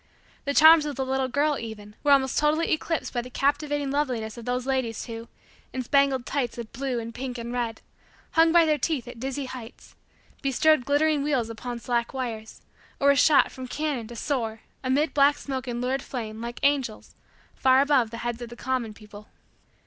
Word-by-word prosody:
The 280 0 -1
charms 315 0 +8
of 290 - -4
the 265 - -2
little 265 0 0
girl, 285 +3 +1
even, 210 -2 -8
were 290 - +2
almost 265 -2 +4
totally 305 +2 +2
eclipsed 320 0 -1
by 240 - 0
the 250 - -10
captivating 285 +1 0
loveliness 250 -7 -1
of 235 - -9
those 250 0 -1
ladies 260 -5 -1
who, 230 -1 -7 0.5
in 260 - -2
spangled 275 -1 +2
tights 265 -5 -2
of 235 -2 -7
blue 265 -1 -2
and 230 0 -6
pink 250 0 -5
and 235 +1 -5
red, 235 -2 -2 0.5
hung 325 0 +5
by 340 -1 +6
their 305 -1 +1
teeth 290 -8 -1
at 240 -1 -9
dizzy 270 +2 -3
heights, 250 -2 -10 0.5
bestrode 275 0 +3
glittering 295 +1 +2
wheels 265 -6 0
upon 240 +2 -6
slack 235 +1 -2
wires, 225 -4 -5 0.4
or 280 - +4
were 280 - +6
shot 290 +2 +5
from 260 -1 -8
cannon 285 -4 -2
to 240 - -9
soar, 225 -4 -2 0.2
amid 275 +4 +1
black 285 0 +4
smoke 265 -2 -5
and 240 0 -3
lurid 260 +2 -1
flame, 225 -3 -6
like 235 0 -6
angels, 275 -6 0 0.4
far 260 0 +4
above 275 -5 +3
the 230 - -7
heads 240 0 -3
of 240 - -6
the 240 - -9
common 240 -3 -2
people. 210 0 -13
260 Hz, 195 wpm, -26 LUFS, 235-285 Hz, 0.5 s, charms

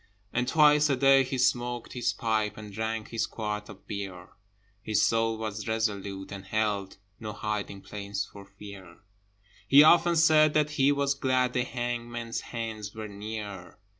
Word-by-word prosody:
And 125 +1 0
twice 150 +1 +5
a 140 - +3
day 135 +1 +5
he 130 0 -3
smoked 120 -1 0
his 120 -2 0
pipe, 110 -3 -1
And 105 -1 -9
drank 110 +1 -3
his 115 - -1
quart 105 -1 -4
of 100 -2 -13
beer: 95 -3 -6 0.5
His 110 0 +2
soul 115 0 +1
was 110 0 -5
resolute, 100 -3 -2
and 100 -1 -8
held 100 -1 -1 0.2
No 110 -2 -6
hiding 105 -3 -4
place 100 +1 -5
for 100 - -13
fear; 100 -2 -12 0.7
He 140 +2 +8
often 170 +2 +5
said 155 -2 +5
that 150 0 +2
he 140 -2 +3
was 140 -1 +1
glad 130 -2 +1
The 125 - +1
hangman's 120 -1 -4
hands 110 -3 -6
were 110 -1 -6
near. 100 -3 -7
110 Hz, 160 wpm, -28 LUFS, 105-125 Hz, 0.7 s, He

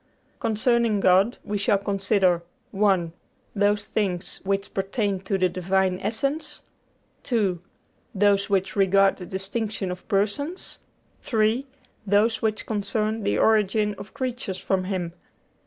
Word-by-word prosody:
Concerning 230 -1 +2
God, 195 +5 +4
we 205 0 -3
shall 200 0 +3
consider 195 -3 +1 0.3
(1) 195 -5 +2 0.4
those 205 0 +2
things 185 -4 -2
which 195 +1 -2
pertain 195 0 -1
to 195 +1 -2
the 185 -1 +3
Divine 185 +1 0
Essence; 275 +8 -2 0.6
(2) 200 -9 0 0.5
those 200 +1 +3
which 195 -1 0
regard 195 0 +4
the 180 - -8
distinction 195 0 -3
of 180 +1 -8
persons; 220 - -2 0.4
(3) 225 +3 +1 0.4
those 210 +3 +3
which 215 -1 -1
concern 215 +1 -1
the 105 - 0
origin 210 - +3
of 205 - -11
creatures 250 -8 -3
from 190 -1 -1
Him. 180 -3 -3
200 Hz, 125 wpm, -25 LUFS, 190-220 Hz, 0.6 s, God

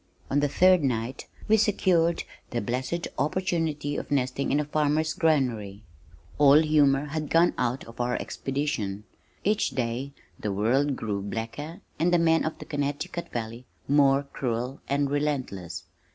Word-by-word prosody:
On 140 - +3
the 145 - +2
third 185 +3 +5
night 125 -1 -2 0.2
we 220 - +5
secured 185 -5 +2 0.3
the 120 - -2
blessed 130 +9 -2
opportunity 155 -2 -1
of - - -5
nesting 135 -1 0
in 145 - +3
a 150 - -1
farmer's 155 +1 +1
granary. 120 -11 0 0.6
All 145 0 +7
humor 145 -2 +3
had 155 0 -3
gone 170 +1 +4
out 125 +1 -1
of 115 +1 -7
our 125 +1 0
expedition. 130 -8 -3 0.4
Each 210 +1 +2
day 125 +2 -2 0.3
the 105 - -2
world 130 +8 +1
grew 105 -4 -3
blacker, 115 - -5 0.2
and 170 +3 +2
the 175 - +5
men 165 -1 +3
of 160 - -3
the - - -9
Connecticut 145 +4 -3
Valley 115 +1 -5 0.2
more 140 -1 +4
cruel 125 -1 -3
and 140 +1 +1
relentless. 110 - -2
140 Hz, 150 wpm, -27 LUFS, 120-155 Hz, 0.6 s, All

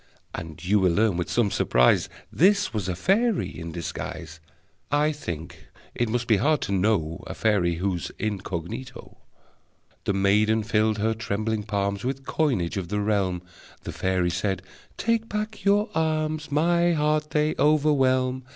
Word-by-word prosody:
And 80 0 -7
you 105 +3 +3
will 90 -3 +3
learn 105 +1 +2
with 90 0 -2
some 115 -5 +1
surprise 60 0 +3 0.2
This 200 0 +3
was 100 -4 -2
a 90 - -1
fairy 200 - +1
in 85 0 -7
disguise! 85 0 -6 0.5
(I 150 +1 +3
think 85 - -7 0.3
it 120 -2 -1
must 120 +1 -1
be 110 -3 +3
hard 150 +6 +2
to - - -3
know 95 -5 0
A - - -6
fairy 95 -6 +1
who's 90 0 -2
incognito!) 105 +3 -5 0.9
The - - +1
maiden 105 +3 +3
filled 110 0 +1
her 110 +2 +1
trembling 110 0 -2
palms 100 -1 -2
With 135 +1 -3
coinage 120 - 0
of 95 -3 -3
the 105 +2 -2
realm. 100 -4 0 0.4
The - - -5
fairy 90 -2 0
said: 90 +1 -2 0.3
"Take 230 -1 0
back 215 +1 -4
your 205 +1 +3
alms! 155 -1 -1
My 170 +3 +3
heart 150 0 +1
they 150 0 +1
overwhelm. 135 -3 +2
110 Hz, 150 wpm, -25 LUFS, 95-150 Hz, 0.9 s, you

